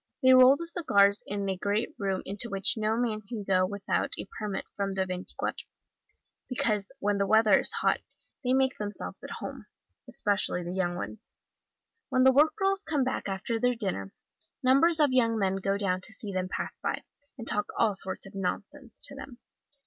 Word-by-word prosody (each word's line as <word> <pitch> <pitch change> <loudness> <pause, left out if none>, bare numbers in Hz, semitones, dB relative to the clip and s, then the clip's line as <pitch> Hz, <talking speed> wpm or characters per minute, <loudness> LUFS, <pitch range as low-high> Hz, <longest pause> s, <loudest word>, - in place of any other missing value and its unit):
They 260 0 +8
roll 255 +1 +8
the 335 - -6
cigars 200 - +3
in 200 0 -2
a 190 - 0
great 205 +4 -1
room 195 -2 -1
into 205 +5 -1
which 195 -2 +1
no 220 0 0
man 225 -3 -1
can 215 0 -6
go 185 -1 +2
without 200 0 -2
a - - -5
permit 210 -3 -3
from 195 -1 -2
the 190 0 +1
Veintiquatro, 185 0 -4 0.9
because 225 -7 0
when 205 0 0
the 200 - +1
weather 220 -2 +5
is - - +1
hot - - +1 0.4
they 250 0 +2
make 265 0 +1
themselves 210 0 -6
at - - -7
home, - - -7 0.4
especially 205 -6 -1
the 175 +1 -5
young 175 -2 -1
ones. 220 +5 -7 0.8
When 255 - +3
the 265 - +7
work 300 +4 +4
girls 390 -1 +1
come 305 -9 0
back 255 -5 -2
after 195 +4 -2
their 245 +1 +2
dinner, 185 - -3 0.5
numbers 310 +6 +5
of 290 -4 +4
young 230 -3 +3
men 195 -2 +1
go 195 +1 0
down 185 -2 -1
to 220 - -3
see 210 -2 -7
them 185 0 -2
pass - - -4
by, - - -2 0.3
and 230 -2 -8
talk 210 - +1
all 220 -3 +3
sorts 190 -1 -2
of 195 - -12
nonsense 210 +6 -5
to - - -4
them. 275 -2 -9
210 Hz, 190 wpm, -28 LUFS, 195-255 Hz, 0.9 s, They